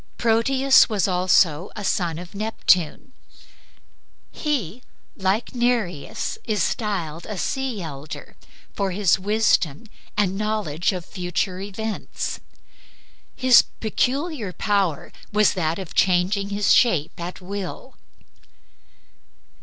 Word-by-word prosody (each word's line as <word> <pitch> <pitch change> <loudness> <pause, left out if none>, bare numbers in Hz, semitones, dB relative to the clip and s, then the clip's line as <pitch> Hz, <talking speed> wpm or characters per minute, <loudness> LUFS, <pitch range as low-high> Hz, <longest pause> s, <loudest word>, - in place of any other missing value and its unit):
Proteus 260 +5 +4
was 210 -3 +1
also 180 -2 +3
a 210 - -5
son 175 -4 0
of 175 +1 -9
Neptune. 205 - +1 1.2
He, 250 - -2 0.3
like 195 +6 -1
Nereus, 240 - -1
is 210 -5 0
styled 170 -8 -2
a 210 - -5
sea 260 -3 -2
elder 145 -1 -8 0.4
for 200 -1 -1
his 195 -2 +3
wisdom 200 -6 +1 0.3
and 195 -2 +2
knowledge 205 -6 -1
of 180 -3 -5
future 180 0 -3
events. 205 +2 -4 1.0
His 255 -2 +7
peculiar 255 - -2
power 195 -7 0 0.2
was 210 0 +4
that 165 -3 -1
of 190 -4 -7
changing 190 +2 +2
his 200 0 +3
shape 175 - +2
at 175 +1 -6
will. 200 +6 -6
200 Hz, 105 wpm, -23 LUFS, 175-220 Hz, 1.2 s, His